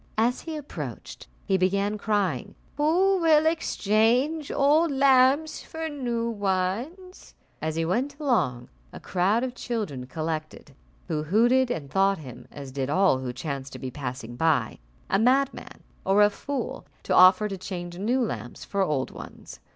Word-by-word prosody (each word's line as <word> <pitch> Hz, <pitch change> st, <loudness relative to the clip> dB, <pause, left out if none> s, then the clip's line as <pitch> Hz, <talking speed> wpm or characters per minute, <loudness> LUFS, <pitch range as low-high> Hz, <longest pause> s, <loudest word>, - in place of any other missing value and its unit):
As 235 Hz, +3 st, +1 dB
he 325 Hz, -2 st, -6 dB
approached, 295 Hz, -1 st, -8 dB, 0.2 s
he 195 Hz, -2 st, +2 dB
began 200 Hz, +3 st, +1 dB
crying, 205 Hz, -2 st, -1 dB, 0.2 s
"Who 365 Hz, +6 st, +3 dB
will 315 Hz, -2 st, +5 dB
exchange 270 Hz, -1 st, +1 dB
old 300 Hz, +4 st, +3 dB
lamps 275 Hz, +2 st, +3 dB
for 320 Hz, 0 st, -5 dB
new 240 Hz, -5 st, -2 dB
ones?" 225 Hz, -, -3 dB, 0.3 s
As 155 Hz, 0 st, -2 dB
he 165 Hz, 0 st, 0 dB
went 265 Hz, -, -1 dB
along, 160 Hz, -, 0 dB, 0.2 s
a -, -, -9 dB
crowd 195 Hz, +6 st, +1 dB
of 255 Hz, -1 st, -3 dB
children 210 Hz, -, -4 dB
collected, 155 Hz, 0 st, -5 dB, 0.3 s
who 155 Hz, -3 st, -1 dB
hooted, 240 Hz, +10 st, +3 dB
and 155 Hz, -12 st, -3 dB
thought 195 Hz, 0 st, +3 dB
him, 130 Hz, -7 st, -11 dB
as 140 Hz, -2 st, -9 dB
did 135 Hz, 0 st, -3 dB
all 185 Hz, -4 st, +3 dB
who 130 Hz, -1 st, -4 dB
chanced 135 Hz, +1 st, -5 dB
to -, -, -6 dB
be 130 Hz, -2 st, -5 dB
passing 125 Hz, -3 st, -6 dB
by, 145 Hz, -6 st, +1 dB, 0.3 s
a -, -, +1 dB
madman 265 Hz, +4 st, 0 dB, 0.2 s
or 200 Hz, +2 st, +4 dB
a 205 Hz, -, +4 dB
fool, 285 Hz, +5 st, -5 dB, 0.2 s
to -, -, -1 dB
offer 185 Hz, +3 st, +7 dB
to 195 Hz, -, -4 dB
change 180 Hz, -2 st, -7 dB
new 240 Hz, +6 st, +1 dB
lamps 120 Hz, -, -5 dB
for 200 Hz, -, -2 dB
old 150 Hz, -8 st, 0 dB
ones. -, -, -11 dB
205 Hz, 155 wpm, -26 LUFS, 160-265 Hz, 0.3 s, offer